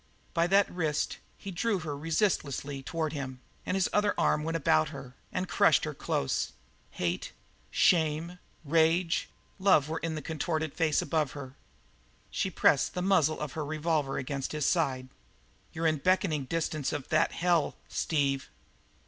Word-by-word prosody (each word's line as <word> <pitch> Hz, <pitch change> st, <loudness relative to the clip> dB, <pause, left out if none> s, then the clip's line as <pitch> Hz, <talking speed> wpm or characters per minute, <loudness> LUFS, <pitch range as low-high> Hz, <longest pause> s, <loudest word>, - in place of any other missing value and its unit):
By 170 Hz, +1 st, +2 dB
that 195 Hz, +2 st, +4 dB
wrist 160 Hz, -4 st, -1 dB, 0.2 s
he 195 Hz, -, -7 dB
drew 205 Hz, +4 st, 0 dB
her 150 Hz, -2 st, -4 dB
resistlessly 145 Hz, -4 st, -1 dB
toward 160 Hz, +2 st, -2 dB
him, 130 Hz, -3 st, -5 dB, 0.3 s
and 185 Hz, -, 0 dB
his 190 Hz, -, +2 dB
other 210 Hz, 0 st, +2 dB
arm 150 Hz, -, +2 dB
went 165 Hz, +1 st, -1 dB
about 80 Hz, -, +3 dB
her 125 Hz, -1 st, -9 dB, 0.2 s
and 185 Hz, 0 st, -2 dB
crushed 150 Hz, -, +4 dB
her -, -, -2 dB
close; 65 Hz, -, -1 dB, 0.4 s
hate, 90 Hz, 0 st, -3 dB, 0.4 s
shame, 165 Hz, +1 st, +2 dB, 0.3 s
rage, 165 Hz, +3 st, +2 dB, 0.3 s
love 185 Hz, -7 st, +4 dB
were 160 Hz, +1 st, -2 dB
in 165 Hz, -1 st, -3 dB
the 155 Hz, -, -4 dB
contorted 160 Hz, -1 st, -2 dB
face 160 Hz, -3 st, +2 dB
above 155 Hz, -4 st, 0 dB
her. 135 Hz, -2 st, -8 dB, 0.8 s
She 190 Hz, -, -1 dB
pressed 150 Hz, -5 st, +3 dB
the 180 Hz, -, -1 dB
muzzle 160 Hz, -5 st, +3 dB
of 150 Hz, -2 st, -4 dB
her 155 Hz, -, -3 dB
revolver 150 Hz, -2 st, -1 dB
against 135 Hz, +1 st, -3 dB
his 150 Hz, -2 st, -1 dB
side. 135 Hz, -7 st, +1 dB, 0.6 s
"You're 165 Hz, +1 st, -3 dB
in 155 Hz, -1 st, +3 dB
beckoning 160 Hz, -3 st, +1 dB
distance 155 Hz, -1 st, -1 dB
of 145 Hz, -4 st, -5 dB
that -, -, +2 dB
hell, 170 Hz, -3 st, +1 dB
Steve!" 140 Hz, -4 st, 0 dB
155 Hz, 155 wpm, -30 LUFS, 140-170 Hz, 0.8 s, that